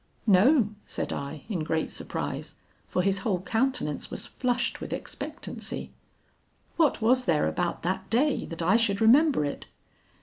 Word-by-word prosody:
"'No,' 215 Hz, +4 st, +5 dB, 0.2 s
said -, -, -3 dB
I, 140 Hz, +1 st, -5 dB
in 185 Hz, -8 st, -2 dB
great 160 Hz, 0 st, -1 dB
surprise, -, -, -4 dB, 0.3 s
for 180 Hz, -, 0 dB
his 195 Hz, 0 st, +2 dB
whole 195 Hz, -4 st, 0 dB
countenance 220 Hz, -, -1 dB
was -, -, -5 dB
flushed 250 Hz, -1 st, -1 dB
with -, -, -5 dB
expectancy. -, -, -5 dB, 0.8 s
'What 300 Hz, -8 st, +2 dB
was 255 Hz, +3 st, +4 dB
there 155 Hz, -7 st, +2 dB
about 175 Hz, -1 st, -2 dB
that 185 Hz, +3 st, -2 dB
day 270 Hz, +5 st, +1 dB
that 165 Hz, 0 st, -5 dB
I 185 Hz, +7 st, +5 dB
should 205 Hz, -4 st, +1 dB
remember 255 Hz, -, +5 dB
it?' 145 Hz, -, -5 dB
210 Hz, 145 wpm, -27 LUFS, 175-250 Hz, 0.8 s, No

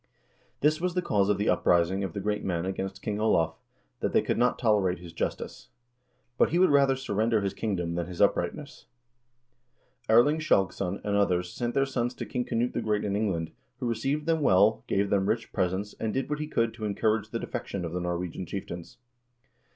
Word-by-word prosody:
This 155 Hz, +3 st, +2 dB
was 180 Hz, 0 st, -1 dB
the 180 Hz, -, +2 dB
cause 100 Hz, -9 st, +2 dB
of 105 Hz, -, +2 dB
the 105 Hz, -, -1 dB
uprising 90 Hz, +3 st, +2 dB
of 95 Hz, -4 st, -4 dB
the -, -, -3 dB
great 105 Hz, +1 st, -2 dB
men 85 Hz, -2 st, -1 dB
against 95 Hz, 0 st, -4 dB
King 105 Hz, -1 st, -2 dB
Olav, 85 Hz, -7 st, +2 dB, 0.5 s
that -, -, -1 dB
they -, -, +4 dB
could -, -, -1 dB
not 125 Hz, +1 st, +3 dB
tolerate 105 Hz, -6 st, +2 dB
his 85 Hz, -1 st, -11 dB
justice. -, -, -4 dB, 0.7 s
But -, -, +5 dB
he 170 Hz, -, +1 dB
would 185 Hz, -3 st, +5 dB
rather 140 Hz, -1 st, +4 dB
surrender 110 Hz, -3 st, 0 dB
his 100 Hz, -1 st, -1 dB
kingdom 90 Hz, -6 st, -2 dB
than 85 Hz, 0 st, -2 dB
his 90 Hz, -1 st, -8 dB
uprightness." 120 Hz, -, 0 dB, 0.6 s
* 120 Hz, 0 st, -41 dB
Erling 120 Hz, +8 st, +5 dB
Skjalgsson 95 Hz, -, +1 dB
and 105 Hz, -1 st, 0 dB
others 90 Hz, -3 st, +1 dB
sent 120 Hz, -1 st, -3 dB
their 135 Hz, -, +3 dB
sons 125 Hz, -2 st, -2 dB
to -, -, -5 dB
King 125 Hz, -2 st, -2 dB
Knut 120 Hz, 0 st, -1 dB
the -, -, -1 dB
Great 105 Hz, -1 st, 0 dB
in 100 Hz, -1 st, -1 dB
England, 95 Hz, -6 st, -1 dB, 0.3 s
who 130 Hz, -, -3 dB
received 135 Hz, +6 st, -1 dB
them 165 Hz, -1 st, +1 dB
well, 105 Hz, -3 st, +4 dB
gave 100 Hz, 0 st, 0 dB
them 100 Hz, 0 st, +2 dB
rich 115 Hz, +1 st, -2 dB
presents, 95 Hz, +2 st, -1 dB
and 110 Hz, -, -1 dB
did 135 Hz, +2 st, -2 dB
what 150 Hz, -, -1 dB
he 150 Hz, -, -3 dB
could 115 Hz, -5 st, 0 dB
to 110 Hz, -2 st, -6 dB
encourage 105 Hz, +1 st, 0 dB
the 115 Hz, -, -3 dB
defection 95 Hz, -5 st, -4 dB
of 85 Hz, -, -4 dB
the 90 Hz, -, -2 dB
Norwegian 90 Hz, 0 st, -3 dB
chieftains. 85 Hz, -3 st, -7 dB
105 Hz, 205 wpm, -28 LUFS, 95-125 Hz, 0.7 s, But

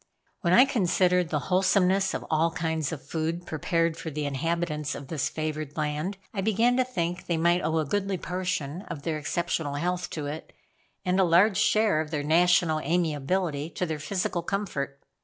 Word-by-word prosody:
When 170 Hz, -, 0 dB
I 245 Hz, +8 st, +8 dB
considered 180 Hz, -, +2 dB
the 150 Hz, -, 0 dB, 0.2 s
wholesomeness 190 Hz, +1 st, +3 dB
of -, -, -4 dB
all 160 Hz, +1 st, +2 dB
kinds 160 Hz, -4 st, -2 dB
of 140 Hz, -4 st, -7 dB
food 165 Hz, +2 st, -2 dB
prepared 165 Hz, +1 st, 0 dB
for 160 Hz, -, -5 dB
the 150 Hz, 0 st, -3 dB
inhabitants 150 Hz, +1 st, -2 dB
of 140 Hz, -2 st, -9 dB
this 145 Hz, -5 st, -1 dB
favored 155 Hz, -1 st, -4 dB
land. 155 Hz, +6 st, -2 dB, 0.2 s
I 195 Hz, -, -2 dB
began 225 Hz, +4 st, +3 dB
to 255 Hz, -, +4 dB
think 180 Hz, -8 st, -3 dB
they 170 Hz, -, +1 dB
might 170 Hz, +2 st, +3 dB
owe 160 Hz, 0 st, 0 dB
a 155 Hz, -, +1 dB
goodly 195 Hz, +5 st, -1 dB
portion 180 Hz, -3 st, -3 dB
of 140 Hz, -, -6 dB
their 160 Hz, -2 st, -2 dB
exceptional 160 Hz, -2 st, -2 dB
health 180 Hz, +4 st, -1 dB
to 150 Hz, -, -3 dB
it, 150 Hz, +2 st, -6 dB, 0.5 s
and 185 Hz, +1 st, +2 dB
a -, -, +6 dB
large 185 Hz, +4 st, +4 dB
share 215 Hz, -7 st, +3 dB
of 155 Hz, -, -5 dB
their 150 Hz, -2 st, -2 dB
national 165 Hz, 0 st, +3 dB
amiability 160 Hz, 0 st, 0 dB
to 175 Hz, +2 st, -2 dB
their 160 Hz, -3 st, -3 dB
physical 180 Hz, +1 st, -2 dB
comfort. 170 Hz, -8 st, -3 dB
170 Hz, 180 wpm, -27 LUFS, 155-185 Hz, 0.5 s, I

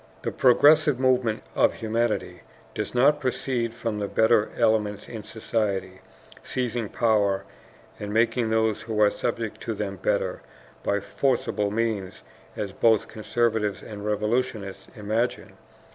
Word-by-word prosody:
The -, -, -1 dB
progressive 145 Hz, +2 st, +5 dB
movement 125 Hz, -4 st, +2 dB
of -, -, +3 dB
humanity 110 Hz, -5 st, -1 dB, 0.3 s
does -, -, -4 dB
not 145 Hz, +4 st, +4 dB
proceed 125 Hz, -3 st, -2 dB
from 115 Hz, -3 st, -3 dB
the 100 Hz, -, -2 dB
better 110 Hz, 0 st, +3 dB
elements 105 Hz, -2 st, +1 dB
in 115 Hz, -2 st, -7 dB
society 100 Hz, -4 st, -3 dB, 0.4 s
seizing 120 Hz, -4 st, -2 dB
power 105 Hz, -4 st, +2 dB, 0.6 s
and 105 Hz, 0 st, -5 dB
making 115 Hz, +1 st, +2 dB
those 110 Hz, -1 st, +1 dB
who 110 Hz, -1 st, -3 dB
are 105 Hz, -1 st, +5 dB
subject 115 Hz, -2 st, -3 dB
to 115 Hz, -, -3 dB
them 100 Hz, -1 st, -4 dB
better, -, -, -1 dB, 0.4 s
by 100 Hz, 0 st, 0 dB
forcible 105 Hz, -2 st, 0 dB
means, 100 Hz, -, -2 dB, 0.3 s
as 100 Hz, -2 st, -3 dB
both 110 Hz, -1 st, +3 dB
conservatives 110 Hz, -2 st, -1 dB
and 105 Hz, -2 st, -8 dB
revolutionists 105 Hz, -2 st, -2 dB
imagine. 110 Hz, +3 st, -2 dB
110 Hz, 130 wpm, -25 LUFS, 105-120 Hz, 0.6 s, progressive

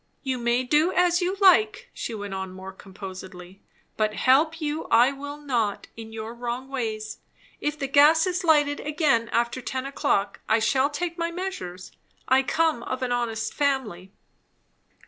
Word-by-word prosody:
"You 260 Hz, -2 st, -2 dB
may 240 Hz, +1 st, +1 dB
do 300 Hz, +7 st, +2 dB
as 360 Hz, 0 st, +2 dB
you 370 Hz, +2 st, -1 dB
like," 290 Hz, -, +4 dB
she 230 Hz, -, -5 dB
went 205 Hz, -2 st, -6 dB
on 190 Hz, -1 st, -4 dB
more 190 Hz, +1 st, -8 dB
composedly, 190 Hz, -1 st, -10 dB, 0.4 s
"but 215 Hz, -1 st, 0 dB
help 310 Hz, +6 st, +3 dB
you 305 Hz, 0 st, -3 dB
I 240 Hz, +4 st, +4 dB
will 285 Hz, +1 st, -7 dB
not 240 Hz, -8 st, -2 dB
in 225 Hz, -1 st, -9 dB
your 220 Hz, +1 st, -6 dB
wrong 245 Hz, +2 st, -5 dB
ways. 220 Hz, -5 st, -4 dB, 0.4 s
If 295 Hz, 0 st, -2 dB
the 275 Hz, -, -3 dB
gas 295 Hz, +4 st, +5 dB
is 365 Hz, 0 st, -1 dB
lighted 295 Hz, -3 st, +3 dB
again 290 Hz, -7 st, +1 dB
after 235 Hz, +2 st, 0 dB
ten 260 Hz, +1 st, -4 dB
o'clock, 200 Hz, -7 st, -1 dB
I 220 Hz, -, +5 dB
shall 260 Hz, +5 st, +2 dB
take 340 Hz, +3 st, -4 dB
my 335 Hz, 0 st, 0 dB
measures. 335 Hz, -, -6 dB, 0.4 s
I 260 Hz, +1 st, +5 dB
come 315 Hz, -1 st, +1 dB
of 255 Hz, +2 st, -4 dB
an 250 Hz, -, -2 dB
honest 225 Hz, -2 st, -2 dB
family." 245 Hz, -, -1 dB
255 Hz, 165 wpm, -25 LUFS, 220-300 Hz, 0.4 s, gas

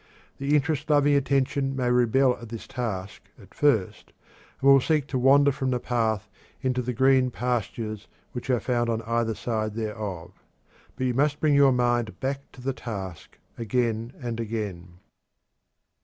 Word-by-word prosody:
The 140 Hz, +2 st, +1 dB
interest 150 Hz, +1 st, 0 dB
loving 145 Hz, -1 st, +4 dB
attention 135 Hz, 0 st, +1 dB
may 125 Hz, -2 st, 0 dB
rebel 125 Hz, +1 st, +3 dB
at 115 Hz, -, -9 dB
this 115 Hz, -1 st, -7 dB
task 100 Hz, -6 st, -5 dB, 0.2 s
at -, -, -17 dB
first, 125 Hz, -10 st, 0 dB, 0.5 s
and 140 Hz, -, +5 dB
will 135 Hz, -1 st, +7 dB
seek 150 Hz, 0 st, +1 dB
to 130 Hz, -, -1 dB
wander 140 Hz, +2 st, +5 dB
from 135 Hz, -1 st, -2 dB
the 125 Hz, -1 st, 0 dB
path 110 Hz, -5 st, -1 dB, 0.4 s
into 130 Hz, -1 st, 0 dB
the 125 Hz, +1 st, -3 dB
green 130 Hz, +1 st, +3 dB
pastures 115 Hz, -3 st, -3 dB, 0.2 s
which 125 Hz, +1 st, -7 dB
are 125 Hz, -2 st, +3 dB
found 120 Hz, +1 st, 0 dB
on 115 Hz, 0 st, -1 dB, 0.3 s
each 110 Hz, -, -3 dB
side 110 Hz, -2 st, -2 dB
thereof. 105 Hz, -6 st, -5 dB, 0.6 s
But 130 Hz, -, -2 dB
you 125 Hz, -, +1 dB
must 145 Hz, +3 st, +1 dB
bring 150 Hz, -2 st, +3 dB
the 140 Hz, -1 st, +6 dB
mind 120 Hz, -3 st, 0 dB
back 135 Hz, +1 st, -4 dB
to 130 Hz, -, -13 dB
the 135 Hz, +1 st, -2 dB
task, 95 Hz, -9 st, -7 dB, 0.2 s
again 115 Hz, +1 st, -1 dB
and 120 Hz, -3 st, -4 dB
again. 100 Hz, -6 st, -5 dB
125 Hz, 160 wpm, -26 LUFS, 110-135 Hz, 0.6 s, will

